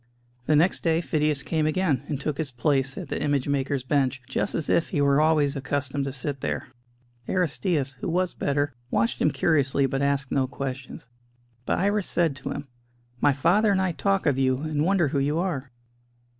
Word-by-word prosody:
The 155 - +4
next 165 +5 +3
day 165 -1 +2
Phidias 150 -4 +1
came 155 -1 0
again, 155 -5 +1
and 145 -4 -3
took 140 0 -3
his 155 -3 -1
place 135 +1 0
at - - -6
the - - -3
image 145 -2 0
maker's 140 -1 -1
bench, 130 -1 +1
just 135 - -2
as 155 - -2
if 165 - +2
he 155 - -1
were 140 +1 +4
always 155 -2 +3
accustomed 140 0 -2
to 135 - -3
sit 135 +1 -4
there. - - -3 0.6
Aristćus, 160 -6 0
who 130 - -4
was 180 +1 0
better, 145 0 -1 0.2
watched 115 -1 0
him - - +4
curiously, 140 -4 +2
but 135 +1 -1
asked 140 -1 0
no 135 -2 +1
questions. 135 -2 -6 0.6
But - - +1
Iris 200 +1 +1
said 165 -5 +1
to 135 - -6
him: 145 -1 -5 0.5
"My 145 - +4
father 180 +10 +3
and 195 - +2
I 190 -1 +1
talk 195 +3 0
of 140 -4 +2
you, 130 -1 +2
and 155 -1 -1
wonder 180 -5 +2
who 140 - 0
you 145 +3 0
are." 160 -7 -2
145 Hz, 195 wpm, -25 LUFS, 135-160 Hz, 0.6 s, The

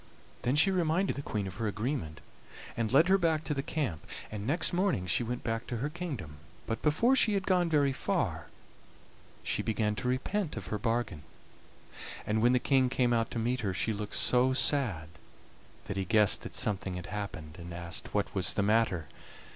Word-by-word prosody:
Then 125 +3 +1
she 180 +7 +5
reminded 180 +1 +1
the 140 - -4
Queen 105 -7 -3
of 95 -1 -7
her 115 -1 -1
agreement, 105 - -3 0.5
and 115 -2 -1
led 155 +6 +6
her 195 +1 +4
back 160 -3 +1
to 150 - -1
the 135 - -1
camp, 135 - -3 0.2
and 105 0 -5
next 165 +6 +3
morning 175 - +1
she 85 - +2
went 120 +1 -3
back 115 +1 -2
to 120 - -3
her 135 +6 -2
kingdom, 140 - -6 0.3
but 115 - -3
before 230 - +3
she 220 -5 +3
had 195 0 -1
gone 180 -2 +2
very 145 -3 +3
far - - -1 1.0
she - - 0
began 110 -1 0
to 105 - -2
repent 155 +8 -1
of - - -5
her 105 - -1
bargain, 115 -7 -1 1.0
and 110 +1 +1
when 120 +2 +5
the - - +5
King 130 0 +3
came 125 -2 +2
out 115 -1 +1
to - - -5
meet 120 +3 0
her 100 -6 -2
she 110 - 0
looked 105 0 -5
so 125 +1 +4
sad 120 - +1 0.8
that 100 - -4
he 95 - 0
guessed 105 +1 +4
that - - -7
something 95 -3 -1
had 90 -1 -6
happened, 95 -5 -6
and 85 0 -8
asked 85 0 -6
what 105 -1 -1
was 95 -2 +2
the 100 - +2
matter. 105 -6 +2
115 Hz, 195 wpm, -31 LUFS, 100-145 Hz, 1.0 s, led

